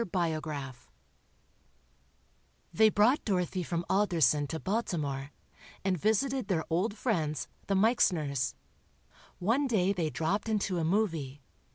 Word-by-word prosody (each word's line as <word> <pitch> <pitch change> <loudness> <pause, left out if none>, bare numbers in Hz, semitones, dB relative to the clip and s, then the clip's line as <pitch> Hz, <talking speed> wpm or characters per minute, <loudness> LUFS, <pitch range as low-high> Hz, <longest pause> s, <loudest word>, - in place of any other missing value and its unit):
BIOGRAPH" 155 - -3 1.8
They 220 0 +6
brought 215 +7 +3
Dorothy 185 -3 -1
from 170 0 -3
Alderson 160 -8 +2
to 160 - -4
Baltimore, 155 -10 -2 0.6
and 190 -1 +2
visited 235 - 0
their 175 -6 0
old 205 +6 0
friends, 155 - -1 0.2
the 195 - +1
Meixners. 165 - +2 0.8
One 235 +10 +1
day 200 -5 +2
they 170 -5 -1
dropped 190 +9 -1
into 200 -4 0
a - - -1
"movie." 160 -7 -1
180 Hz, 110 wpm, -30 LUFS, 155-210 Hz, 1.8 s, They